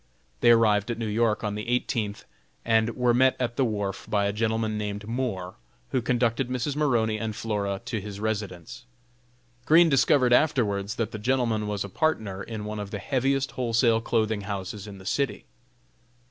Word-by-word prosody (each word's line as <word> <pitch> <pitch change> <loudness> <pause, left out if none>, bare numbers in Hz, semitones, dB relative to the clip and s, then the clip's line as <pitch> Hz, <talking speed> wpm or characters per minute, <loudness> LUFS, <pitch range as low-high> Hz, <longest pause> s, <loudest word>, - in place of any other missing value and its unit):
They - - +4
arrived 110 -2 +4
at 120 - -2
New 115 - -3
York 110 0 +1
on 105 -1 -1
the 105 +2 -5
eighteenth 115 -4 -1 0.4
and 115 0 +2
were 125 -1 +2
met 130 +2 +4
at 120 -2 -1
the 135 - +2
wharf 100 -4 -2
by 100 -1 +1
a 100 - 0
gentleman 110 0 0
named 105 0 -4
Moore, 110 -7 -3 0.3
who 130 - +1
conducted 120 +1 0
Mrs. 130 +3 -2
Maroney 115 -7 +1
and 110 -1 -3
Flora 100 -3 -2
to 110 -4 -3
his 100 0 -7
residence. 105 -2 -4 0.8
Green 165 +2 +7
discovered 135 -2 +4
afterwards 105 -8 +2
that 115 -1 -2
the 110 - -6
gentleman 115 -2 0
was 105 -1 -2
a - - -5
partner 105 -6 -1
in 110 -1 -6
one 105 0 -4
of 100 -1 -5
the 105 - -4
heaviest 135 +6 0
wholesale 115 -2 +2
clothing 110 -2 0
houses 100 0 -5
in 100 -1 -9
the 95 - -13
city. 140 +7 -1
110 Hz, 175 wpm, -26 LUFS, 105-120 Hz, 0.8 s, Green